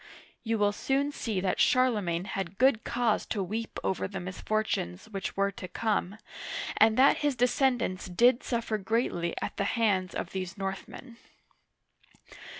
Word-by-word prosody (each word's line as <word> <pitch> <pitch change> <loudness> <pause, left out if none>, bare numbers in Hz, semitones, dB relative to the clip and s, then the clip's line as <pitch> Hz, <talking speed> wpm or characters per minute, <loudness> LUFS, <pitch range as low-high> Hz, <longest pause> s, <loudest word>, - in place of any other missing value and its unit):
" - - -27
You 225 -1 0
will 205 -1 +3
soon 275 +6 0
see 220 -8 -2
that 185 -1 0
Charle 255 -5 +4
magne 170 -1 -1
had 195 -2 -4
good 255 -2 +4
cause 235 -3 +1
to 200 - -1
weep 220 +4 -4
over 190 - -1
the 195 0 -5
misfortunes 185 - -2
which 195 -2 -5
were 200 0 +2
to 185 -1 -8
come, 205 0 -1 0.6
and 220 0 +5
that 270 +2 +6
his 290 -2 0
descendants 245 -5 +1
did 240 +7 +4
suffer 230 -3 -2
greatly 190 -5 -1
at - - -5
the - - +1
hands 195 -5 +1
of - - -4
these 185 0 -5
Northmen. 195 +5 -6
215 Hz, 155 wpm, -29 LUFS, 190-235 Hz, 0.6 s, that